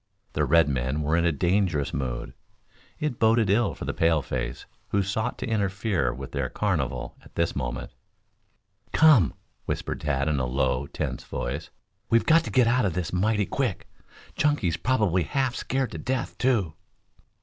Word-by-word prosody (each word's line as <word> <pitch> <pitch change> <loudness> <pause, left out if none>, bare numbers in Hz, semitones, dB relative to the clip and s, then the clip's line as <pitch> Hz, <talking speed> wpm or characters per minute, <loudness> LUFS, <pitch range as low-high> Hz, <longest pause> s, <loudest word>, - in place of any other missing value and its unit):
The 75 - +1
red 80 +2 +5
men 65 +2 -1
were 75 +2 +1
in 85 0 +2
a 85 - +4
dangerous 85 -1 +1
mood. 65 -3 -3 0.7
It 150 -6 -2
boded 110 -2 +4
ill 105 0 +2
for - - -6
the - - -2
paleface 70 -6 0 0.2
who 100 -1 +1
sought 110 +5 -2
to - - -4
interfere 100 - 0
with 65 +2 -8
their - - -2
carnival - - -2
at - - -18
this - - 0
moment. - - -4 1.0
"Come!" 145 - +6 0.3
whispered - - -3
Tad 70 -1 0
in 75 -3 +1
a 65 - 0
low, 65 +1 0
tense - - -4
voice. 65 +4 -4 0.4
"We've 115 0 +3
got 165 +1 +5
to - - -4
get 125 -2 +4
out 125 +2 +3
of 95 - 0
this 90 -2 -3
mighty 105 +3 +2
quick! 125 -6 -2 0.5
Chunky's 140 - +1
probably 105 -5 +1
half 130 - 0
scared 130 -1 -2
to - - -6
death, 130 0 -2
too." 110 -11 +1
90 Hz, 165 wpm, -26 LUFS, 70-115 Hz, 1.0 s, Come